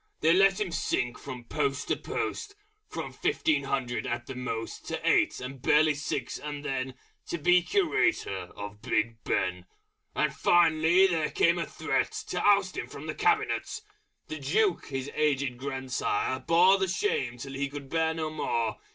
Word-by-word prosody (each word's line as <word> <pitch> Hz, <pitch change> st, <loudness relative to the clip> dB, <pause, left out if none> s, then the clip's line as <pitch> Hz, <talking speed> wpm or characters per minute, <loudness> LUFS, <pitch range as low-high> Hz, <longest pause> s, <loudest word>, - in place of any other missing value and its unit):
They 160 Hz, +2 st, +5 dB
let 195 Hz, +2 st, +4 dB
him 200 Hz, -4 st, -1 dB
sink 125 Hz, -6 st, -1 dB
from 130 Hz, -3 st, -8 dB
Post 140 Hz, +2 st, -2 dB
to -, -, +3 dB
Post, 410 Hz, -2 st, -4 dB, 0.3 s
From -, -, -5 dB
fifteen 145 Hz, -3 st, +1 dB
hundred 130 Hz, -3 st, -2 dB
at 120 Hz, 0 st, -3 dB
the 135 Hz, -, -6 dB
most 125 Hz, -3 st, -5 dB
To -, -, -3 dB
eight, -, -, +3 dB
and 130 Hz, +1 st, -7 dB
barely 150 Hz, +3 st, +4 dB
six 145 Hz, 0 st, -3 dB
and 145 Hz, -1 st, -6 dB
then 130 Hz, -2 st, -2 dB, 0.3 s
To 170 Hz, -, -2 dB
be 180 Hz, +3 st, +4 dB
Curator 350 Hz, -, 0 dB
of 105 Hz, +1 st, -7 dB
Big 115 Hz, -1 st, -1 dB
Ben!... 90 Hz, 0 st, -1 dB, 0.5 s
And -, -, +1 dB
finally 170 Hz, +1 st, +4 dB
there 165 Hz, -5 st, +1 dB
came 170 Hz, +1 st, +3 dB
a 170 Hz, -, -2 dB
Threat -, -, -1 dB, 0.2 s
To -, -, -1 dB
oust 200 Hz, -2 st, +3 dB
him -, -, -3 dB
from -, -, -9 dB
the -, -, -3 dB
Cabinet! 430 Hz, 0 st, 0 dB, 0.5 s
The 155 Hz, -, -5 dB
Duke 180 Hz, +7 st, +1 dB
his 135 Hz, 0 st, -4 dB
aged 140 Hz, -5 st, 0 dB
grand 130 Hz, -1 st, -5 dB
sire 130 Hz, +1 st, 0 dB
bore 175 Hz, +7 st, +5 dB
The 190 Hz, -, +1 dB
shame 140 Hz, -10 st, -1 dB
till 135 Hz, +3 st, -7 dB
he 140 Hz, +1 st, -2 dB
could 140 Hz, -1 st, -8 dB
bear 160 Hz, +2 st, 0 dB
no 155 Hz, -1 st, -3 dB
more. 115 Hz, -8 st, -1 dB
145 Hz, 170 wpm, -28 LUFS, 130-175 Hz, 0.5 s, They